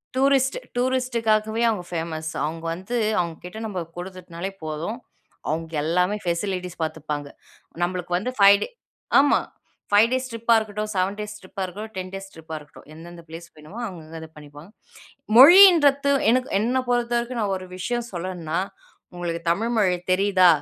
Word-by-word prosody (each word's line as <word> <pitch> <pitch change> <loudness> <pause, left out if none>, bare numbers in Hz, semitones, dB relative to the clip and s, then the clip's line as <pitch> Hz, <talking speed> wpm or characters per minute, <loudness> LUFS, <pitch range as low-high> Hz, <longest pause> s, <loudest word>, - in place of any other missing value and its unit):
Tourist, 270 0 +2 0.2
டூரிஸ்ட்டுக்காகவே 235 -4 +1
அவுங்க 210 -5 -2
famous. 160 -1 -3
அவுங்க 160 +2 -4
வந்து, 190 +8 -4 0.2
அவங்க 170 -2 -2
கிட்ட 180 +4 -8
நம்ப 195 -4 -4 0.2
குடுத்துட்டுனாலே 180 0 -7
போதும். 155 +8 -4 0.5
அவுங்க 160 +1 -3
எல்லாமே 180 +5 +1
ஃபேசிலிட்டீஸ் 180 0 -3
பாத்துப்பாங்க. 150 -2 -4 0.6
நம்பளுக்கு 175 0 -2
வந்து 250 +7 -3
5 200 0 +7
டே, - - -4 0.5
ஆமா. 285 - +4 0.5
5 210 +3 +6
டேஸ் 260 0 -1
ட்ரிப்பா 230 0 +1
இருக்கட்டும் 215 -1 -3
7 190 +2 0
டேஸ் 210 0 -6
ட்ரிப்பா 190 +1 -8
இருக்கட்டும், 210 +5 -8
10 185 0 -4
டேஸ் 195 0 -8
ட்ரிப்பா 160 0 -9
இருக்கட்டும். 150 0 -16
எந்தெந்த 170 +2 -11
பிளேஸ் 165 +1 -9
வேணுமோ, 155 +9 -12
அவுங்க 180 -6 -7
வந்து 160 +1 -9
அத 160 - -8
பண்ணிப்பாங்க. 145 +4 -13 0.7
மொழின்றத்து 290 -2 +8 0.2
எனக்கு 255 +2 +1
என்ன 245 +5 +1
பொருத்தவரைக்கும், 240 0 0
நான் 200 -2 0
ஒரு 185 - -10
விஷயம் 240 +5 -3
சொல்லனுன்னா, 175 -2 -3 0.6
உங்களுக்கு 170 -1 -3
தமிழ் 225 +8 +1
மொழி 185 -4 +3
தெரியுதா, 185 -1 +4
190 Hz, 150 wpm, -23 LUFS, 170-230 Hz, 0.7 s, மொழின்றத்து